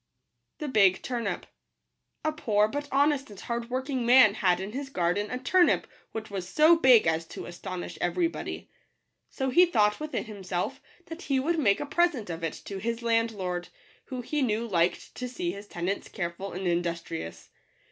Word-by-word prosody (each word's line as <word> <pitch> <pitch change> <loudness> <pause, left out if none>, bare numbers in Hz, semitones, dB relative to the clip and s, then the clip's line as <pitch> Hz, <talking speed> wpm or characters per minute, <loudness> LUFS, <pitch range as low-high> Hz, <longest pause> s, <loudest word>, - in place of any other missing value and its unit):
Vfg 215 - +3
®utn(p* 240 -2 -2 0.8
B 310 - +2
POOR 210 -8 +2
but 290 +6 -4
honest 280 -1 +2
and 205 -2 -11
hardworking 250 +2 -3
man 240 -3 +7
had 185 -4 +2
in 190 +2 -5
his 270 +3 -5
garden 190 -1 0
a 250 - -3
turnip 345 +8 +3 0.3
which 220 -1 -6
was 190 -2 -4
so 310 - +6
big 260 -8 +6
as 160 0 0
to - - -8
astonish 175 +1 -7
every 335 - +1
body. 330 - -7 0.6
So 265 -2 -2
he 355 +7 +6
thought 210 -9 +2
within 305 0 -3
himself 190 -4 -4 0.2
that 325 +2 -8
he 275 -6 0
would 325 +5 0
make 200 -8 +3
a - - -3
present 290 - +1
of 165 0 -6
it 165 - -1
to 195 -1 -5
his 230 +3 -3
landlord, 215 -6 0 0.4
who 255 -2 -5
he 295 +5 -2
knew 230 -2 0
liked 175 -4 0
to 250 0 -5
see 175 -8 -3
his 200 +2 -9
tenants 180 +3 -3
careful 175 +1 -4
and 185 +2 -5
in 175 -1 +2
dustrious. 170 - -5
220 Hz, 175 wpm, -28 LUFS, 185-265 Hz, 0.8 s, man